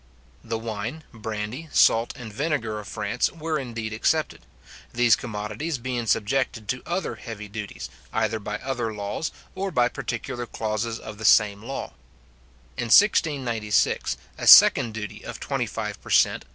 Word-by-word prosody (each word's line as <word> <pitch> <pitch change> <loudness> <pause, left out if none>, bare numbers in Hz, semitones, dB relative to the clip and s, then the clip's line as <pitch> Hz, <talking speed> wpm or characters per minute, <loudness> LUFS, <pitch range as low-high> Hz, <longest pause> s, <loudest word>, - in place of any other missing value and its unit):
The 115 -1 -3
wine, 115 +7 -5
brandy, 110 +7 -5
salt, 115 +1 +4
and 115 -4 -8
vinegar 125 -6 -1
of 105 - -9
France, 85 - -1
were 160 -1 -2
indeed 115 -4 -5
excepted; 110 - 0 0.5
these 120 -2 +4
commodities 110 +7 -4
being 120 -1 -3
subjected 110 0 0
to 125 - -1
other 175 +2 -2
heavy 105 -2 -8
duties, 105 0 -6 0.2
either 110 0 0
by 105 +1 -4
other 125 -2 -3
laws, 105 +8 -3 0.2
or 195 +1 -3
by 125 -8 +2
particular 120 0 -4
clauses 110 +1 -2
of 105 -1 -9
the - - -7
same 105 -1 +5
law. 135 +4 -5 0.9
In 120 - -2
1696, 120 - +3 0.2
a - - -3
second 110 -2 +8
duty 105 -2 -6
of - - -7
twenty - - -2
five - - -5
per - - -12
cent. - - +3
115 Hz, 150 wpm, -25 LUFS, 105-130 Hz, 0.9 s, second